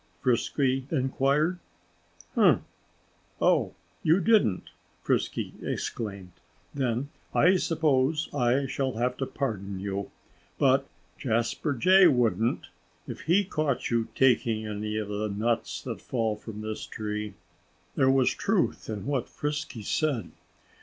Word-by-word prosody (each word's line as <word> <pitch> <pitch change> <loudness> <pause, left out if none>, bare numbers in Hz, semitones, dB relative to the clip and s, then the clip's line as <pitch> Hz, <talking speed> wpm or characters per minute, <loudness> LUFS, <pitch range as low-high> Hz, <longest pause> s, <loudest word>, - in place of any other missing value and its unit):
Frisky 130 +1 +1
inquired. 140 +4 +1 0.8
"Umph!" - - +5 0.8
"Oh, - - +2 0.3
you 165 +4 +4
didn't!" 195 - +2 0.3
Frisky - - -1
exclaimed. 100 -5 -4 0.4
"Then 130 0 -1 0.3
I 185 +2 +5
suppose 155 -3 +1
I 130 0 +2
shall 135 0 -2
have 125 +3 0
to 135 - -2
pardon 100 -8 -3
you. 100 0 -3 0.5
But 135 -1 +3 0.3
Jasper 120 +5 0
Jay 185 +8 +6
wouldn't, 115 - +1 0.4
if - - -7
he 180 +6 +3
caught 155 -10 -1
you 115 -1 +1
taking 115 -4 +3
any 105 0 -3
of 110 -1 -2
the 105 +1 -2
nuts 115 +3 -1
that - - -5
fall 115 -4 -1
from 105 0 -8
this 110 0 -5
tree." 105 -1 -4 0.6
There 130 - +3
was 135 -1 +4
truth - - 0
in 105 -3 -4
what 135 -4 -1
Frisky 145 -6 -4
said. 140 +1 -1
125 Hz, 120 wpm, -28 LUFS, 110-140 Hz, 0.8 s, Jay